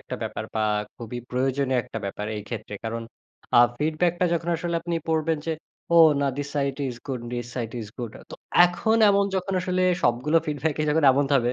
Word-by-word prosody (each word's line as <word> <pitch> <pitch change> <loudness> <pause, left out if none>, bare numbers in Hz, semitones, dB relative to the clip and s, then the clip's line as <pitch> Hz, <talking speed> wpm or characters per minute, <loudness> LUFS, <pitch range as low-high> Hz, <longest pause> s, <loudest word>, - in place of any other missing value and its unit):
একটা - - -7
ব্যাপার - - -4
বা 110 - +1 0.3
খুবই 120 +1 -6
প্রয়োজনীয় 130 0 +1
একটা 115 - -6
ব্যাপার 105 +1 -4
এই 105 - -5
ক্ষেত্রে। 110 -3 -6
কারণ 115 +1 -3 0.6
আ - - +10 0.2
feedback 160 +3 +1
টা - - +4
যখন 170 +1 -2
আসলে 170 +1 -3
আপনি 170 0 -2
পড়বেন 160 -1 +1
যে, 165 - 0 0.4
ও - - +6 0.2
না 140 - +2
this 145 0 -3
side 140 -1 0
is 120 - -6
good, 130 -3 -3
this 120 -1 -3
side 115 -3 -3
is 105 - -7
good. 115 -3 -5 0.2
তো - - -6 0.3
এখন 220 +6 +1
এমন 200 0 +3
যখন 190 +1 -2
আসলে 185 0 0 0.2
সবগুলো 125 +7 +2
feedback 150 0 -1
ই 155 - +1
যখন 155 0 +2
এমন 140 +2 +2
ত - - +2
হবে 120 0 0
140 Hz, 210 wpm, -25 LUFS, 120-165 Hz, 0.6 s, আ